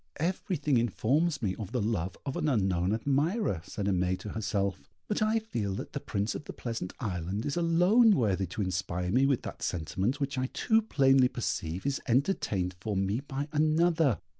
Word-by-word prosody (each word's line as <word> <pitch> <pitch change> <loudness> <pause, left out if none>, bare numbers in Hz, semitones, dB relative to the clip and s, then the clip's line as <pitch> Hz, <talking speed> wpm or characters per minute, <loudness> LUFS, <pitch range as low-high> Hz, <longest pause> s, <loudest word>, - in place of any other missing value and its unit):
"Everything 160 -4 0
informs 135 - +1
me 95 -3 +1
of 105 -3 -6
the 125 - +1
love 100 -5 -1
of 135 - -3
an 155 - 0
unknown 95 -7 +1
admirer," 140 - 0
said 100 +3 -5
Aimée 90 -1 +1
to 100 +3 -8
herself; 100 -3 -1 0.3
"but 210 - -1
I 215 +1 +3
feel 115 - -2
that - - -6
the - - -2
Prince 100 +2 -2
of 150 - -7
the - - -7
Pleasant 115 -7 -4
Island 95 0 -3
is 140 - -1
alone 180 +7 +5
worthy 100 -5 +1
to 100 +5 -3
inspire 90 -1 -2
me 130 +5 +4
with 135 -3 +1
that - - -7
sentiment 95 - -1
which 140 -1 -2
I 130 - 0
too 220 - +2
plainly 135 - +4
perceive 90 -7 -3
is 140 -1 -1
entertained 115 - +1
for 100 +1 -2
me 100 +4 0
by 140 +1 -4
another. 155 - +3
120 Hz, 185 wpm, -30 LUFS, 95-150 Hz, 0.3 s, alone